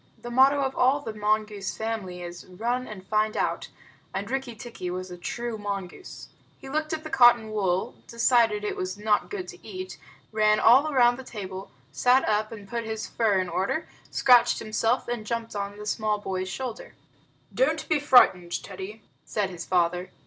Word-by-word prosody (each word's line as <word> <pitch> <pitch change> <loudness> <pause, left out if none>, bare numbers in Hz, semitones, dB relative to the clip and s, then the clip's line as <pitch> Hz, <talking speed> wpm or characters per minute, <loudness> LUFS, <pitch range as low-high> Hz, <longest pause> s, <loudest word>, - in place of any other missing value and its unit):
The 240 - -8
motto 270 +3 +5
of 265 0 -2
all 270 +3 +3
the 225 -6 -6
mongoose 210 -1 -1
family 205 -6 -4
is 175 0 -9
"Run 235 +7 -2
and 190 -3 -9
find 215 +1 0
out," - - -1 0.5
and 200 +4 -3
Rikki 265 -3 -3
tikki 225 -5 -7
was 185 +1 -5
a - - -6
true 230 +5 -4
mongoose. 200 - -6 0.3
He 270 - -11
looked 310 +2 -2
at 315 -1 -3
the 310 - -8
cotton 240 -3 +5
wool, 195 +1 0
decided 230 -3 +3
that 210 - -1
it - - -4
was 185 +1 -4
not 210 0 +1
good 390 -3 -5
to - - -12
eat, 370 0 -7 0.3
ran 215 0 +3
all 270 +7 +6
round 245 -2 +4
the - - -7
table, 195 -5 -7 0.2
sat 255 +2 +3
up 215 0 +1
and 205 -3 -9
put 235 +2 -3
his 220 -1 -4
fur 215 -4 +1
in 185 - -1
order, 195 - -1 0.2
scratched 245 -2 +5
himself, 225 +3 0
and 240 -2 -3
jumped 230 0 -4
on 200 0 -4
the 210 - -8
small 215 0 0
boy's 190 -2 -4
shoulder. 245 +4 -6 0.6
"Don't - - +1
be 310 - +2
frightened, 190 -11 +4
Teddy," 200 +3 -8 0.2
said 200 -3 -2
his 175 -1 -7
father. 180 0 +1
215 Hz, 185 wpm, -26 LUFS, 195-245 Hz, 0.6 s, all